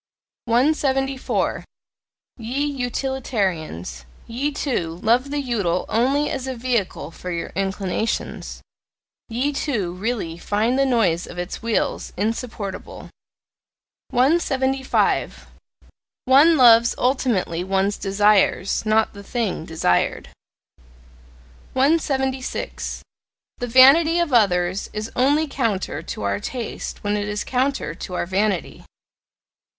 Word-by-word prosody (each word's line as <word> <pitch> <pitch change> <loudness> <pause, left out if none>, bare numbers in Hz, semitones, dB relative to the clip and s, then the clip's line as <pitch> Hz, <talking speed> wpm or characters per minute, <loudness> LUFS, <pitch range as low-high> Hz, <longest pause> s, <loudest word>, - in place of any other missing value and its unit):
174. 270 +1 +1 0.7
Ye 250 +5 -2
Utilitarians 225 - -3 0.2
ye, 255 +6 -2
too, 175 - -2
love 245 +5 +3
the 290 +1 -2
UTILE 200 -9 -1
only 270 +6 +2
as 265 -1 -4
a 260 - -3
VEHICLE 230 - -2
for 180 - -8
your 170 -1 -3
inclinations, 195 +2 -3 0.7
ye, 255 +6 -1
too, 220 - -2
really 185 -4 -3
find 220 +8 0
the 275 - +3
noise 190 -9 +1
of 175 - -10
its 175 +1 -5
wheels 230 -1 -1
insupportable! 215 -1 -4 1.0
175. 265 -1 +1 0.8
One 290 +6 +6
loves 235 -2 +6
ultimately 245 -10 0
one's 195 +2 0
desires, 200 -1 +2
not 220 0 +2
the 200 - -10
thing 210 -7 -2
desired. 160 - 0 1.4
176. 265 -2 -1 0.6
The 245 - -3
vanity 275 +7 +6
of 340 -5 0
others 185 -4 +2
is 215 +1 -4
only 290 +5 +3
counter 230 -9 -2
to - - -6
our 100 0 0
taste 240 - -6
when 205 0 0
it 205 0 -2
is 210 0 -2
counter 255 - -1
to 180 +2 -7
our - - -1
vanity. 190 0 -1
230 Hz, 105 wpm, -22 LUFS, 195-265 Hz, 1.4 s, One